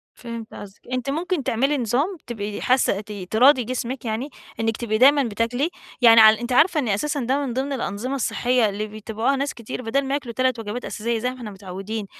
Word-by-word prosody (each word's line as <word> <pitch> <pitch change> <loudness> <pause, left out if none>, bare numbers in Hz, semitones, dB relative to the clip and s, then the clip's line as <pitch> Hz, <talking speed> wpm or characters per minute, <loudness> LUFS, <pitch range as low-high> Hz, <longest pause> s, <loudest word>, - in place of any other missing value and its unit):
فهمت 230 -2 -8
قصدِك. 200 0 -11
أنتِ 255 +1 -2
ممكن 325 0 -1
تعملي 270 +7 +1
نظام 270 - 0
تبقي 210 -3 -5
حاسة 250 -6 +2
ت 215 0 -12 0.2
تراضي 255 +4 +5
جسمِك، 250 +1 -4
يعني 225 +6 -3 0.3
إنك 225 0 0
تبقي 215 -2 -1
دايمًا 280 +3 +6
بتاكلي 235 +7 -1 0.3
يعني. 230 -2 +8
ع 220 - +10
أنتِ 235 +3 -1
عارفة 315 +5 +4
إن 255 - -1
أساسًا 285 +9 -1
ده 270 +3 0
من 245 - -3
ضمن 270 +3 -2
الأنظمة 250 +1 -3
الصحية 245 -3 +1
اللي 210 +2 -4
بيتبعوها 220 +5 -2
ناس 280 +2 -2
كتير، 235 +1 -7
بدل 270 +4 0
ما 270 - -2
ياكلوا 265 -5 -3
3 255 -1 0
وجبات 225 +3 -5
أساسية 230 +1 -2
زي 250 - -1
ما 255 - -8
إحنا 230 -4 -7
متعودين، 195 +2 -6
240 Hz, 200 wpm, -23 LUFS, 220-270 Hz, 0.3 s, ع